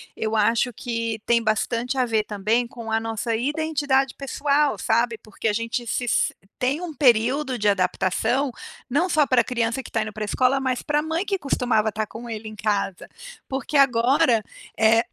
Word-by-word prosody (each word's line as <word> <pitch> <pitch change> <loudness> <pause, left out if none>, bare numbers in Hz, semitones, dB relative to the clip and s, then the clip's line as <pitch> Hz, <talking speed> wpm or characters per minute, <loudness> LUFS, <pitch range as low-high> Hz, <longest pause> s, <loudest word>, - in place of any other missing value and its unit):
Eu 220 0 -2
acho 230 +4 +2
que 230 -1 -3
tem 235 -1 +3
bastante 230 +4 -1
a 255 - +3
ver 220 -2 +1
também 220 +4 0
com 230 -2 -8
a 225 - +2
nossa 225 0 -2
identidade 280 -1 0
pessoal, 280 +1 0
sabe, 235 0 +1
porque 215 +1 -5
a 210 - +2
gente 230 +2 -2
se 245 - -1
s 240 - +1 0.2
tem 275 +7 0
um 340 -3 -5
período 255 +1 +2
de 210 -1 0
adaptação, 200 +7 +1 0.4
não 335 +8 +1
só 305 -2 +3
para 255 -3 +4
a - - -2
criança 235 +1 -1
que - - -11
tá 225 - 0
indo 215 -1 -7
para 215 - -4
a - - -1
escola, 255 +1 +2
mas 255 -2 -1
pra 295 0 +1
a - - +1
mãe 320 +5 -2
que 395 -1 0
costumava 240 -5 +1
estar 215 0 -3
com 235 +1 -9
ele 215 -1 -6
em 215 - -10
casa 205 -3 -1 0.4
porque 275 +2 -2
agora, 250 -1 +4 0.3
eh, 225 +1 +5
235 Hz, 195 wpm, -23 LUFS, 220-270 Hz, 0.4 s, eh